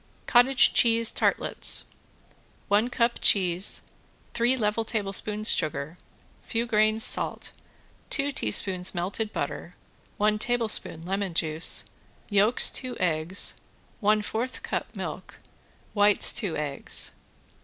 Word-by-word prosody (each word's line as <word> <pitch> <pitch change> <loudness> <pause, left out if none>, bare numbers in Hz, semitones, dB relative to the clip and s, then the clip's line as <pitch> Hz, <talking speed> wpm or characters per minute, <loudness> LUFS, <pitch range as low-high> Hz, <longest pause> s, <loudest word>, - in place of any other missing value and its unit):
~COTTAGE 250 +2 +5
CHEESE 230 -1 +3
TARTLETS~ - - +1 0.9
One 210 +4 +2
cup 235 -1 0
cheese, 185 -1 +1 0.5
three 240 +3 +1
level 215 -1 0
tablespoons 210 0 +1
sugar, 155 +1 -2 0.5
few 230 0 -2
grains 215 -1 +1
salt, - - -2 0.6
two 285 -1 0
teaspoons 185 - +1
melted 200 +5 -3
butter, 145 +4 -5 0.4
one 210 0 +1
tablespoon 220 -8 +1
lemon 195 -1 -3
juice, 160 0 0 0.5
yolks 205 +4 +4
two 255 -2 -5
eggs, 170 +2 0 0.4
one 210 0 +2
fourth 230 +5 -4
cup - - -4
milk, - - -7 0.6
whites 205 -1 +3
two 190 -6 -3
eggs. 145 -2 -4
210 Hz, 105 wpm, -26 LUFS, 180-230 Hz, 0.9 s, ~COTTAGE